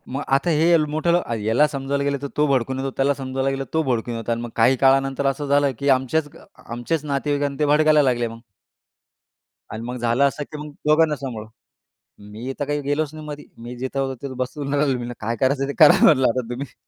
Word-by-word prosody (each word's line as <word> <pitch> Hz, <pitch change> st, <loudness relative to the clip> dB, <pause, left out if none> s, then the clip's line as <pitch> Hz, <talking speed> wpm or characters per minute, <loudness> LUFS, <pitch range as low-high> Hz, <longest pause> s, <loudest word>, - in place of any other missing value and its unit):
मग 140 Hz, -, -2 dB
आता 140 Hz, +6 st, 0 dB
हे 165 Hz, -, +4 dB
यल 160 Hz, -2 st, +4 dB
मोठं 160 Hz, +3 st, +1 dB, 0.2 s
ह्याला 115 Hz, +6 st, +2 dB
समजायला 140 Hz, 0 st, -2 dB
गेलं 140 Hz, 0 st, 0 dB
तर 140 Hz, -, -3 dB
तो 150 Hz, -, +4 dB
भडकून 130 Hz, -1 st, 0 dB
येतो. 135 Hz, 0 st, -3 dB
त्याला 135 Hz, +1 st, +2 dB
समजवायला 135 Hz, 0 st, -2 dB
गेलं 135 Hz, 0 st, -2 dB
तर 130 Hz, -, -15 dB
तो 160 Hz, -, +2 dB
भडकून 120 Hz, -3 st, -2 dB
येतो 115 Hz, +1 st, -4 dB
आणि 115 Hz, -, -1 dB
मग 120 Hz, -, -5 dB
काही 120 Hz, +3 st, +4 dB
काळानंतर 135 Hz, +1 st, +3 dB
असं 135 Hz, +2 st, -2 dB
झालं, 140 Hz, 0 st, +3 dB
की 140 Hz, 0 st, 0 dB
आमच्याच 145 Hz, +4 st, -2 dB
अ, -, -, -15 dB, 0.3 s
आमच्याच 140 Hz, +6 st, -2 dB
नातेवाईकांना 145 Hz, 0 st, -1 dB
ते 150 Hz, -, +2 dB
भडकायला 150 Hz, +1 st, +4 dB
लागले 120 Hz, -3 st, +1 dB
मग. 115 Hz, 0 st, -10 dB, 1.3 s
आणि 110 Hz, +1 st, -6 dB
मग 125 Hz, +1 st, -5 dB
झालं 120 Hz, +3 st, +1 dB
असं, 145 Hz, -, -6 dB
की 150 Hz, -, -10 dB
मग 150 Hz, 0 st, -7 dB, 0.2 s
दोघांना 155 Hz, 0 st, +3 dB
सांभाळा. 120 Hz, -6 st, -6 dB, 0.8 s
मी 115 Hz, +5 st, -6 dB
तर -, -, +1 dB
काही 145 Hz, +1 st, -2 dB
गेलोच 145 Hz, +2 st, -1 dB
नाही 155 Hz, -1 st, -9 dB
मध्ये. 150 Hz, 0 st, -7 dB, 0.2 s
मी 120 Hz, +1 st, -8 dB
जिथे 130 Hz, +2 st, -4 dB
होतो 135 Hz, -1 st, -1 dB
तिथे 135 Hz, -2 st, -5 dB
बसून 140 Hz, +2 st, -4 dB
राहिलो. 140 Hz, -3 st, +1 dB
मी 120 Hz, -, -5 dB
म्हटलं, 120 Hz, -, -6 dB
"काय 115 Hz, -, -1 dB
करायचं 135 Hz, +1 st, +1 dB
ते -, -, -2 dB
करा -, -, +6 dB
म्हटलं 130 Hz, -5 st, +5 dB
आता 120 Hz, -1 st, -2 dB
तुम्ही." 125 Hz, +1 st, -6 dB
135 Hz, 225 wpm, -22 LUFS, 125-145 Hz, 1.3 s, करा